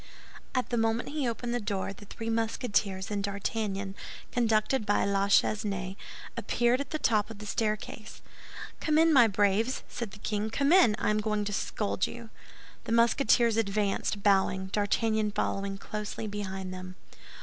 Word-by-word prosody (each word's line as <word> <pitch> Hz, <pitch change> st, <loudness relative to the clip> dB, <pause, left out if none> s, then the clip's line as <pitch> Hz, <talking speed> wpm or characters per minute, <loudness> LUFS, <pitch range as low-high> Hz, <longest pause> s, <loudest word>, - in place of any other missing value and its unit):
At 255 Hz, -1 st, 0 dB
the 240 Hz, -, +1 dB
moment 225 Hz, +1 st, 0 dB
he 285 Hz, -4 st, -1 dB
opened 235 Hz, +1 st, -3 dB
the 245 Hz, -, 0 dB
door, 200 Hz, -2 st, -3 dB
the 205 Hz, -, -13 dB
three 225 Hz, +2 st, -4 dB
Musketeers 215 Hz, -4 st, -1 dB
and 200 Hz, -1 st, -1 dB
D'Artagnan, 200 Hz, -1 st, -2 dB, 0.4 s
conducted 225 Hz, +1 st, +2 dB
by 205 Hz, 0 st, +2 dB
La 200 Hz, 0 st, +1 dB
Chesnaye, 195 Hz, -2 st, +1 dB, 0.4 s
appeared 240 Hz, +2 st, +1 dB
at 280 Hz, -, -6 dB
the 310 Hz, -, -2 dB
top 215 Hz, -7 st, +1 dB
of 225 Hz, -, -9 dB
the 210 Hz, -, -9 dB
staircase. 215 Hz, 0 st, -3 dB, 0.6 s
"Come 305 Hz, -1 st, +1 dB
in, 325 Hz, 0 st, +5 dB
my 245 Hz, -5 st, +7 dB
braves," 205 Hz, +4 st, +1 dB
said 235 Hz, -3 st, -5 dB
the 195 Hz, -, -12 dB
king, 210 Hz, +1 st, -2 dB
"come 280 Hz, +6 st, +1 dB
in; 350 Hz, -, +6 dB
I -, -, +1 dB
am 210 Hz, -, +1 dB
going 210 Hz, -1 st, -1 dB
to 205 Hz, -, -3 dB
scold 200 Hz, -1 st, -1 dB
you." 235 Hz, -2 st, -9 dB, 0.5 s
The -, -, -4 dB
Musketeers 235 Hz, 0 st, +4 dB
advanced, 200 Hz, -1 st, 0 dB
bowing, 190 Hz, -1 st, +2 dB
D'Artagnan 215 Hz, +1 st, +1 dB
following 195 Hz, -1 st, -1 dB
closely 210 Hz, +2 st, -5 dB
behind 190 Hz, -3 st, -4 dB
them. 185 Hz, 0 st, -8 dB
210 Hz, 160 wpm, -29 LUFS, 200-230 Hz, 0.6 s, my